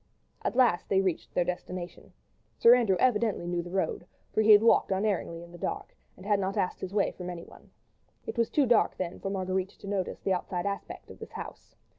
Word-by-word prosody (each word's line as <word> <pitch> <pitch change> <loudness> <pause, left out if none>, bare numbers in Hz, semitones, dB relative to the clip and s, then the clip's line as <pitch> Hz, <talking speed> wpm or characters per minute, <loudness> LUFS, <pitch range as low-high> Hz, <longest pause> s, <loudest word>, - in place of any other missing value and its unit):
At - - -2
last 245 -9 +3
they 190 - +3
reached 185 -4 -1
their 180 - +3
destination. 180 0 -6 0.5
Sir 235 - +8
Andrew 225 -7 +3
evidently 220 -7 +2
knew 175 0 -1
the 175 - -9
road, 185 -1 -2 0.3
for 220 - +3
he 220 - +2
had 210 +1 +8
walked 230 - +4
unerringly 190 -4 -1
in 170 - -13
the 175 - -12
dark, - - -4 0.2
and 185 - -13
had 205 -1 +2
not 195 0 -2
asked 180 - -1
his 190 - -5
way 200 -1 +1
from 180 -1 -7
anyone. 170 -1 -10 0.6
It - - -5
was 230 -2 +1
too 290 - +3
dark 235 -3 +3
then 180 -1 -4
for 195 - -4
Marguerite 190 -1 -1
to - - -11
notice 195 -2 -2
the 190 - 0
outside 180 0 -3
aspect 200 0 -5
of - - -13
this - - -10
house. - - -9
190 Hz, 215 wpm, -29 LUFS, 180-210 Hz, 0.6 s, Sir